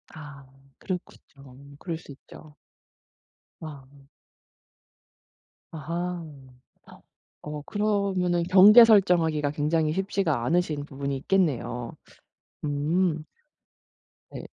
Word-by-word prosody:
아 145 -3 -11 0.3
그렇군요. 140 -6 -9
그럴 170 -3 -5
수 160 - -14
있죠. 150 +2 -15 1.0
아. 140 -3 -12 1.7
아하. 170 +3 -5 1.2
어 150 0 -6
그러면은 195 -3 -1
경계 200 +6 +8
설정하기가 170 -9 +3
굉장히 155 +1 0
쉽지가 190 -9 -1
않으신 155 -2 -1
부분이 140 -1 -5
있겠네요. 135 -8 -1 0.7
음. 155 +3 -1 1.1
네. - - -8
160 Hz, 175 characters per minute, -25 LUFS, 145-180 Hz, 1.7 s, 경계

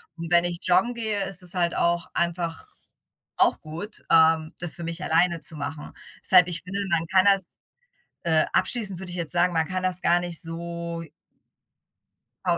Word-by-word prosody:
und 170 0 -7
wenn 175 0 +5
ich 175 -1 -2
joggen 185 +7 +2
gehe, 220 -4 -1
ist 190 -1 -5
es 180 +1 0
halt 175 -2 0
auch 170 0 +1
einfach 170 -2 -2 0.7
auch - - +3
gut, 170 +8 -7
ähm, 160 -1 +4
das 175 -1 -1
für 170 - -7
mich 170 +2 -5
alleine 170 0 +2
zu 165 - 0
machen. 150 0 -6 0.3
Deshalb, 180 -2 +6
ich 170 -2 -3
finde, 195 +2 -4
man 165 -1 +1
kann 185 +2 +3
das 195 -2 +4 0.8
äh, 160 -2 +3
abschließend 205 -7 0
würde 190 - -8
ich - - -6
jetzt 165 -3 +2
sagen, 175 +1 +2
man 160 -1 +1
kann 185 0 -3
das 185 0 +1
gar 175 +1 +3
nicht 175 -2 -1
so 170 0 -5 1.4
pau - - +1
175 Hz, 180 wpm, -25 LUFS, 165-185 Hz, 1.4 s, Deshalb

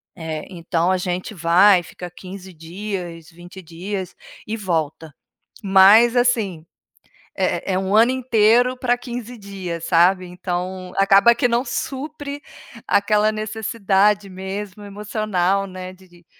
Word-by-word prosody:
eh. 160 -3 -6
Então 170 -1 -1
a 185 - +2
gente 180 +3 -4
vai, 180 +2 +4
fica 175 +1 -9
15 185 +1 -11
dias, 170 0 -7
20 175 +2 -13
dias 185 +3 -6 0.3
e 215 - -3
volta, 160 -6 -3 0.5
mas, 200 +5 +6
assim, 215 -9 +1 0.7
é 195 - -1
é 185 - +1
um 190 +1 -2
ano 230 +3 +5
inteiro 245 0 +3
para 245 -1 0
15 245 -1 -7
dias, 185 -5 -6
sabe, 180 +2 +3
então 180 +1 -5
acaba 195 +4 +5
que 245 - +1
não 240 +1 0
supre 285 +1 -5 0.5
aquela 210 +1 +2
necessidade 210 -2 0
mesmo 190 +2 -7
emocional, 200 -2 -1
né, 185 -1 -8
de 185 0 -19
de 175 -1 -22
195 Hz, 130 wpm, -21 LUFS, 180-215 Hz, 0.7 s, mas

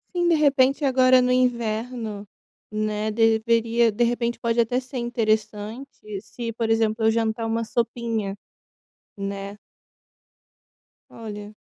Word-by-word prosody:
Sim, 350 -1 +2
de 340 - +4
repente 280 -1 +3
agora 255 -1 +5
no 250 0 +1
inverno, 235 -3 -1 0.4
né, 215 0 -1
deveria, 230 +1 +3
de 215 +3 +1
repente 235 0 0
pode 235 0 0
até 235 +2 +2
ser 260 +1 -8
interessante 220 +1 -2 0.3
se, 235 +2 -6
por 230 0 -2
exemplo, 225 0 +1
eu 220 - +5
jantar 225 0 -1
uma 225 +1 -1
sopinha, 230 -3 -2 0.8
né? 200 0 -5 1.5
Olha. 210 -2 -8
230 Hz, 120 wpm, -24 LUFS, 215-245 Hz, 1.5 s, agora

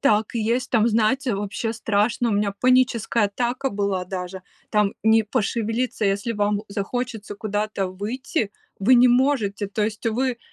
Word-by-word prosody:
Так 220 -4 +2
и 230 - 0
есть. 235 +4 0
Там, 230 -1 +3
знаете, 230 +3 +1
вообще 205 +3 -3
страшно. 225 +2 0
У - - 0
меня 205 0 +1
паническая 250 -3 +3
атака 245 +6 -1
была 200 -3 -1
даже. 180 0 -6 0.3
Там 210 -2 +2
не 220 0 +5
пошевелиться, 225 +1 -1
если 200 +4 0
вам 205 -1 0
захочется 215 +1 -4
куда-то 210 -1 -2
выйти, 215 - -3 0.3
вы 225 +6 +5
не 250 +1 +6
можете. 240 -6 +2
То 205 +2 -2
есть 215 +1 -4
вы 245 +2 0
220 Hz, 155 wpm, -23 LUFS, 205-245 Hz, 0.3 s, не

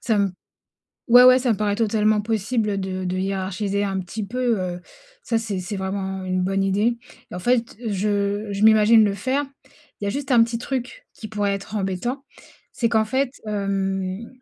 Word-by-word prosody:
Ça 220 -3 +1
me 200 -2 +1 0.8
ouais, 245 +1 +8
ouais 255 0 +8
ça 250 -1 +1
me 215 - 0
paraît 205 0 0
totalement 215 -1 +2
possible, 220 +1 -1
heu, 200 - -2
de 185 -1 -3
de 180 +1 -2
hiérarchiser 195 +1 -2
un 195 -1 -1
petit 195 +4 -5
peu, 240 0 0
heu, 180 -1 -4 0.4
ça 230 - 0
c'est 215 -4 -3
c'est 180 +3 -5
vraiment 190 0 -3
une 185 0 -1
bonne 195 +1 0
idée. 205 +5 +1 0.3
Et - - -6
en - - -4
fait 235 +4 0
je 205 0 -1
je 200 +1 -2
m'imagine 220 +1 +6
le 205 -2 +1
faire, 260 +8 -1 0.6
il - - -2
y - - -1
a - - +1
juste 275 +4 -3
un 235 -2 +6
petit 230 0 -2
truc 250 +1 -5
qui 215 - -9
pourrait 205 -2 -1
être 200 +2 -6
embêtant, 210 +7 -2 0.5
c'est 230 - 0
qu'en 220 -1 +2
fait, 260 +3 0 0.2
hem, 195 0 -2
205 Hz, 195 wpm, -22 LUFS, 195-230 Hz, 0.8 s, ouais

